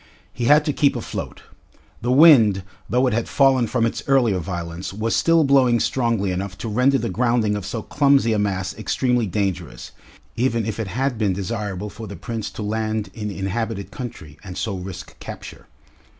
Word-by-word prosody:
He 120 - -3
had 150 +4 +5
to 150 - 0
keep 140 -1 +2
afloat. - - -6 0.6
The 120 +2 0
wind, 125 - +6 0.3
though 125 +2 +2
it 125 - +1
had 115 +1 -1
fallen 135 -4 +3
from 115 0 +1
its 115 - -2
earlier 120 -8 +3
violence, 85 0 -5
was 110 +3 -1
still 165 -1 +4
blowing 130 -4 +4
strongly 115 -6 0
enough 95 +1 -4
to - - -5
render 125 +5 +3
the 120 -2 -2
grounding 115 -3 +1
of 100 -2 -5
so 110 +1 -4
clumsy 140 -5 +3
a 105 - +1
mass 95 -2 -1
extremely 120 +1 0
dangerous, 95 -1 -3 0.4
even 115 -2 0
if 110 0 -4
it 110 - -2
had 125 +3 -2
been 100 -4 +1
desirable 100 0 -4
for 110 0 -8
the 100 - -7
Prince 110 +4 -5
to 110 - -7
land 110 0 -2
in 105 -2 -5
inhabited 100 +1 -3
country, 80 - -8
and 95 -3 -8
so 105 -3 -2
risk 90 0 -8
capture. - - -9
110 Hz, 180 wpm, -22 LUFS, 100-125 Hz, 0.6 s, wind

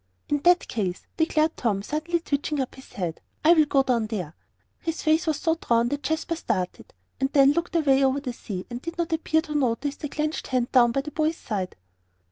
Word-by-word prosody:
"In 290 - +2
that 355 +4 +4
case," 185 -5 -3
declared 320 -1 +2
Tom, 205 -5 0
suddenly 310 +7 -1
twitching 290 -1 -1
up 260 - -2
his 265 - -15
head, 175 -4 -4 0.2
"I 335 - +8
will 315 -3 +5
go 275 -1 +3
down 240 -4 +1
there." 185 -8 -4 0.5
His 325 -1 -4
face 315 +2 +2
was 310 -2 +1
so 325 +1 +1
drawn 235 -7 +1
that 285 +2 -2
Jasper 320 +4 -1
started, 195 - -3 0.3
and 270 +1 0
then 275 -1 +6
looked 340 +3 -2
away 275 -4 +4
over 265 +1 +2
the 260 -3 -5
sea, 195 -6 -6
and 240 +1 -5
did 335 +2 -6
not 335 -1 -1
appear 320 0 +1
to 305 - -6
notice 275 0 0
the 295 - -5
clenched 305 +2 -2
hand 250 -2 0
down 240 -2 +5
by 275 - 0
the 300 +2 -7
boy's 315 +2 0
side. 195 -5 -4
280 Hz, 215 wpm, -25 LUFS, 240-315 Hz, 0.5 s, I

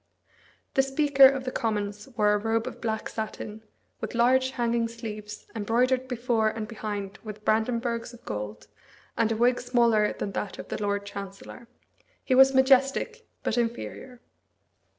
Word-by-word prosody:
The 270 - +5
Speaker 275 0 +6
of 265 -1 -1
the 255 - -3
Commons 210 -3 -2
wore 210 -1 +4
a 210 - +2
robe 225 +1 0
of 255 - -7
black 220 -2 -2
satin, 220 0 -6 0.4
with - - -5
large 255 +2 +4
hanging 235 -2 0
sleeves, 215 -2 -8
embroidered 250 +4 +1
before 235 -3 +1
and 215 0 -5
behind 205 -3 -5
with 215 -1 -9
brandenburgs 230 +1 0
of 240 - -15
gold, 105 0 -5 0.5
and 225 -1 +1
a 220 - 0
wig 245 +2 +3
smaller 235 -4 +3
than 200 - -4
that 195 0 -4
of - - -9
the - - -4
Lord 205 0 -1
Chancellor. 200 +3 -9 0.6
He 260 - 0
was 265 +1 +7
majestic, 270 - +3 0.2
but 240 - 0
inferior. 240 +1 -4
230 Hz, 150 wpm, -27 LUFS, 210-255 Hz, 0.6 s, was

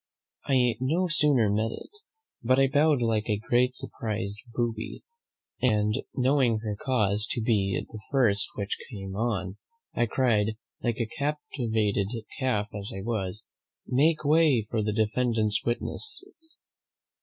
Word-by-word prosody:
I 125 -4 +3
no 160 +8 +1
sooner 145 -8 +3
met 110 +2 +1
it, - - -9 0.5
but 130 +2 +3
I 135 - +6
bowed 145 -1 +3
like 110 -1 0
a 105 - +2
great 125 +4 +1
surprised 105 -4 -4
booby; 115 -1 -3 0.6
and 105 -4 +2 0.2
knowing 130 -3 +3
her 105 -2 -2
cause 105 -3 0
to 120 - -1
be 100 -5 +1
the 110 - -9
first 115 -8 +3
which 100 -1 -3
came 95 -5 -7
on, 100 -4 -2 0.4
I 120 - +1
cried, 110 -3 +1 0.3
like 120 -2 -1
a 115 - 0
captivated 110 -7 -1 0.3
calf 105 -6 0
as 100 0 +1
I 95 - -5
was! 105 -3 -2 0.4
'Make 150 +4 +2
way 150 -7 +4
for 110 - +1
the 105 0 0
defendant's 110 0 +1
witnesses.' 330 - -3
115 Hz, 135 wpm, -27 LUFS, 105-130 Hz, 0.6 s, I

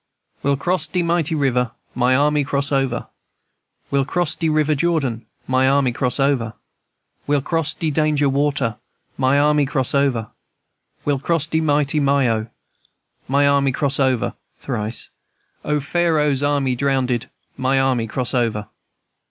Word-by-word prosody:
"We'll 140 0 +1
cross 175 +2 -1
de 180 -1 -1
mighty 170 -2 0
river, 125 -5 +1 0.2
My 125 +1 +2
army 145 +1 +2
cross 140 0 -2
over; 135 -3 0 0.9
We'll 140 -1 +2
cross 175 +3 -1
de 165 -2 0
river 155 0 +2
Jordan, 140 -7 -1 0.2
My 130 +1 +2
army 135 -2 +3
cross 125 +2 -1
over; 130 -5 +1 0.7
We'll 145 -2 +1
cross 160 0 -1
de 160 -2 -1
danger 150 -1 +2
water, 140 -5 0 0.4
My 130 +1 +2
army 150 0 +3
cross 130 -3 -1
over; 135 -6 +1 0.8
We'll 145 -2 +1
cross 160 +2 0
de 160 0 0
mighty 145 -1 +1
Myo, 130 -6 +2 0.8
My 140 +2 +3
army 140 -1 +3
cross 140 +2 -1
over. 130 -3 +1 0.3
(Thrice.) 115 -3 -4 0.5
O, 150 0 0
Pharaoh's 150 -2 +1
army 140 -3 +1
drowndedl 130 -2 0 0.3
My 130 +1 +1
army 130 -4 +1
cross 125 +2 -3
over." 110 -4 -1
140 Hz, 140 wpm, -20 LUFS, 130-150 Hz, 0.9 s, army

